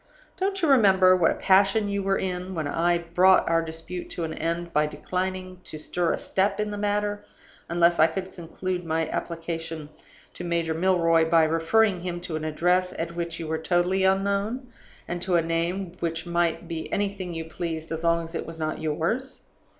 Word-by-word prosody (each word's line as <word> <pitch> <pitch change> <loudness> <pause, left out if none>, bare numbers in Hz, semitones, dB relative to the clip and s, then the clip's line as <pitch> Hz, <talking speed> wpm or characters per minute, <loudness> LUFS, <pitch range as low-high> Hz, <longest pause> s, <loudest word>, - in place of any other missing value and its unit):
Don't 390 -1 -2
you - - +4
remember 190 -8 +6
what 175 -3 +3
a - - 0
passion 195 +2 +3
you 200 0 -1
were 195 0 +1
in 180 0 -3
when 155 -3 -2
I 170 +4 +2
brought 175 +2 +4
our 165 0 +3
dispute 165 +2 -6
to 170 - -4
an 160 - -3
end 170 +1 -3
by 150 0 +3
declining 185 +4 -4
to 155 - -6
stir 170 +2 0
a - - 0
step 195 +2 0
in 210 0 -1
the 205 - -4
matter, 205 0 -1 0.5
unless 170 0 +3
I 160 - +7
could 185 +3 -5
conclude 180 +1 -4
my 160 -1 -1
application 165 -2 -4 0.4
to - - -7
Major 170 -2 0
Milroy 165 -2 +3
by 165 -1 +5
referring 175 +6 +2
him 175 -1 -4
to 170 -2 -5
an 155 - -3
address 180 +4 +1
at 170 +1 -4
which 170 -1 -4
you 165 - -4
were 160 0 -1
totally 175 +3 +1
unknown, 200 +6 0 0.4
and 175 0 -4
to 185 -1 +1
a 170 - +5
name 170 +3 -1
which 165 0 -2
might 170 0 0
be 165 -1 -5
anything 195 -3 -2
you 165 0 -4
pleased, 160 0 -5
as 160 0 -4
long 170 0 +2
as 165 +1 -10
it - - -4
was 165 0 -8
not 155 -1 -3
yours? 170 - -2
175 Hz, 195 wpm, -26 LUFS, 165-190 Hz, 0.5 s, I